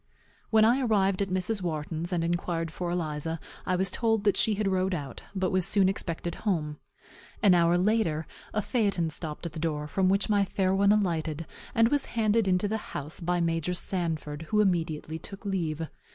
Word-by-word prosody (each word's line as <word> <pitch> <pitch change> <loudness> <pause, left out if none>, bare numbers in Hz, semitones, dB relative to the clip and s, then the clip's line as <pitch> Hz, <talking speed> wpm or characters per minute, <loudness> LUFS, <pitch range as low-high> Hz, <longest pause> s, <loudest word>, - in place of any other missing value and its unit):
When 220 -1 +5
I 245 +4 +4
arrived 200 -5 +2
at 195 - 0
Mrs. 185 +3 -1
Wharton's, 160 0 -3
and 170 -2 0
inquired 170 -1 -1
for 175 +1 -4
Eliza, 160 -2 -2 0.3
I 185 - +2
was 190 0 0
told 225 -1 +1
that 205 -2 +3
she 215 - +3
had 205 0 -1
rode 190 -1 +1
out, 140 -5 -6
but 190 -1 0
was 185 -1 +3
soon 195 +1 +3
expected 175 -3 -2
home. 155 -8 -1 0.6
An 200 -3 +7
hour 170 0 +4
after, 180 -5 +1 0.3
a 215 - -1
phaeton 195 -9 +1
stopped 155 +1 -6
at 170 - -3
the 155 - -7
door, 150 -2 -2
from 185 +4 +1
which 195 +1 +2
my 205 -2 +3
fair 190 0 0
one 200 +1 +4
alighted, 165 -6 0 0.3
and 230 0 +5
was 285 0 +1
handed 220 -1 +3
into 185 +2 +2
the 220 +2 -1 0.2
house 145 +3 -2
by 175 0 0
Major 165 +1 0
Sanford, 160 -4 -2
who 210 - +2
immediately 165 -5 0
took 195 +5 -10
leave. 165 -5 -2
180 Hz, 190 wpm, -28 LUFS, 165-200 Hz, 0.6 s, An